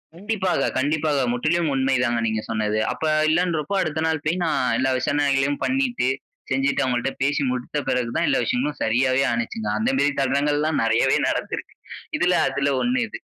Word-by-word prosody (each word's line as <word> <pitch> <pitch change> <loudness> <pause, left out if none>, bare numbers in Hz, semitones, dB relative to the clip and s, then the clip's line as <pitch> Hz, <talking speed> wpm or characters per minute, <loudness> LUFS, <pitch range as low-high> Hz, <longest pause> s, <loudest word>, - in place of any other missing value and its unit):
கண்டிப்பாக, 190 -6 -1
கண்டிப்பாக. 150 +1 0 0.2
முற்றிலும் 155 +5 0
உண்மை 135 0 +1
தாங்க 120 -1 +1
நீங்க 110 -1 -1
சொன்னது. 110 -1 0
அப்ப 125 +5 -6 0.3
இல்லன்றப்ப 170 0 0
அடுத்த 160 0 -2
நாள் 160 -2 -1
போய் 175 +3 0
நான் 160 - +1 0.2
எல்லா 130 0 +1
விசாரணைகளையும் 140 +1 +1
பண்ணிட்டு, 255 - 0 0.4
செஞ்சுட்டு 135 +1 +1
அவங்கள்ட 125 0 0
பேசி 145 +1 +1
முடித்த 125 +3 -3
பெறகு 125 -2 0
தான் - - +1
எல்லா - - +2
விஷயங்களும் 135 +6 -1
சரியாவே 130 +4 +2
ஆணுச்சுங்க. 120 - -3
அந்த 230 +4 0
மேரி 145 - +2
தருணங்கள்லாம் 145 +3 +1
நெறையவே 115 0 +3
நடந்திருக்கு. - - -4 0.4
இதில - - +2
அதில 140 0 0
ஒண்ணு 250 +1 +1
இது. - - -7
140 Hz, 160 wpm, -23 LUFS, 125-160 Hz, 0.4 s, நெறையவே